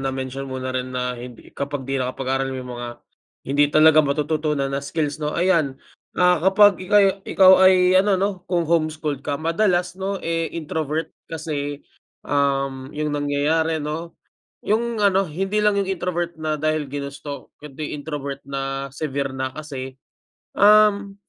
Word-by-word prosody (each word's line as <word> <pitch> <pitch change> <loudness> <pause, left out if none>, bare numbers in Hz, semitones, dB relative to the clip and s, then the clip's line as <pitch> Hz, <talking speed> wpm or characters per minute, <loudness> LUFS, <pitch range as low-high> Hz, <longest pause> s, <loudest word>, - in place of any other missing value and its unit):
na-mention 135 0 -4
mo 130 - -5
rin 130 0 -3
na 125 0 -1
hindi 120 -1 -11
kapag 140 -1 -4
'di 135 0 -2
nakapag-aral 135 +1 -2
may 130 -1 -5
mga, 120 -1 -6 0.6
hindi 145 +2 +2
talaga 155 +1 +6
matututunan 150 -1 -1
na 140 - -1
skills, 150 +1 -3
'no. 150 0 -2
Ayan, 165 -6 +2 0.4
ah, 180 -2 +4
kapag 205 0 +5
ikaw 205 +3 +4
yu 195 -1 +4 0.2
ikaw 190 -1 +7
ay 190 0 +7 0.3
ano 200 0 +2
'no, 195 +2 +1 0.2
kung 175 -2 +1
home-schooled 155 -3 -1
ka, 140 0 -2
madalas 175 +2 +1
'no, 195 +1 -2
eh, 165 0 -1
introvert 155 -1 -3 0.2
kasi, 150 -3 -4 0.4
um, 135 -2 0
yung 150 0 -1
nangyayari 145 +3 0
'no, 160 +3 -5 0.5
yung 225 +1 0
ano, 195 -1 +3
hindi 195 +6 -2
lang 210 -1 +3
yung 195 -1 -1
introvert 175 -2 -2
na 155 -1 -1
dahil 155 -1 0
ginusto, 140 0 -7
kundi 150 0 -7
introvert 140 -2 -5
na 135 0 -3
severe 140 -3 -3
na. 130 0 -3
Kasi, 140 -4 -6 0.7
um, 205 -1 +5
150 Hz, 150 wpm, -22 LUFS, 135-175 Hz, 0.7 s, ikaw